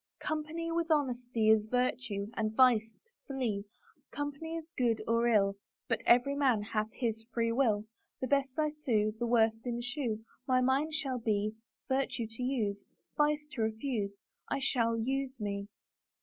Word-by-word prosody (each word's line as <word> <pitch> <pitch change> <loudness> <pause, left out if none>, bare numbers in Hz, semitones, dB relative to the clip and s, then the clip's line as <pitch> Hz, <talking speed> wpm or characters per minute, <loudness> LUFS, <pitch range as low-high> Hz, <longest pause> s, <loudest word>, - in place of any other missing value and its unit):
Company 310 +2 -2
with 335 0 0
honesty 245 -7 +2
Is 215 -1 +4
virtue 240 -4 -1
— - - -22
and 215 0 -1
vice 225 -4 +4
to 475 - -31 0.2
flee; 235 -7 -2 0.4
Company 290 +3 -4
is 325 -1 -5
good 235 -3 +2
or 230 +1 +3
ill 200 -3 +3 0.3
But - - 0
every 245 +4 +5
man 260 -7 +3
hath 215 0 -1
his 225 -3 -2
free 230 0 +1
wilL 225 -4 +2 0.3
The - - -1
best 275 -1 +1
I 305 -1 +2
sue 225 -8 +1
_ - - -24
The 240 - 0
worst 225 -1 +3
eschew; 240 -2 -2 0.2
My 255 -1 +4
mind 270 +5 +2
shall 270 -6 -1
be 215 -2 0 0.3
Virtue 265 -3 0
to 225 +3 -9
use; 215 -6 -1 0.3
Vice 300 0 +2
to 250 - -3
refuse 220 -2 -1 0.3
I - - 0
shall 230 -4 +1
use 265 +3 -2
me. 200 -1 -3
240 Hz, 165 wpm, -32 LUFS, 220-275 Hz, 0.4 s, every